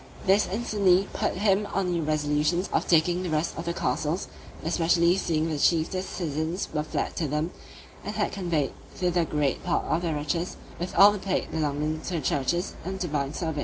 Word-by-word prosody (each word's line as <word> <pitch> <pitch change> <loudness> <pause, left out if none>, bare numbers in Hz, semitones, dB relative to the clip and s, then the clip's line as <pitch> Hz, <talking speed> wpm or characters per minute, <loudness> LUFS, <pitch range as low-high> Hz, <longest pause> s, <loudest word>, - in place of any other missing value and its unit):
This 195 +2 +4
instantly 200 -3 +2
put - - -1
him 200 +1 +2
on 190 -2 +1
new 170 -1 0
resolutions 150 +3 +1
of - - +1
taking 175 +2 +3
the 180 - -3
rest 155 +1 0
of 165 - -5
the 170 - -1
castles, 155 +5 -1 0.4
especially 170 +1 +3
seeing 160 -4 0
the 155 -3 -2
chiefest 170 +4 +1
citizens 160 +2 -2
were 150 - +1
fled 150 - -3
to 160 - 0
them, 150 +4 -1 0.5
and - - -5
had - - 0
conveyed 170 -7 -1 0.2
thither 175 -2 +1
great 150 -3 0
part - - 0
of 165 - 0
their 165 -3 -1
riches, 165 +4 -2 0.2
with 175 +1 -4
all 200 +3 +9
the 205 - -4
plate 190 -1 -2
belonging 150 0 -1
to 180 - -4
the - - 0
churches 150 +5 0
and 190 +3 -4
divine 150 -5 -2
service. 160 -4 -2
170 Hz, 190 wpm, -27 LUFS, 155-185 Hz, 0.5 s, all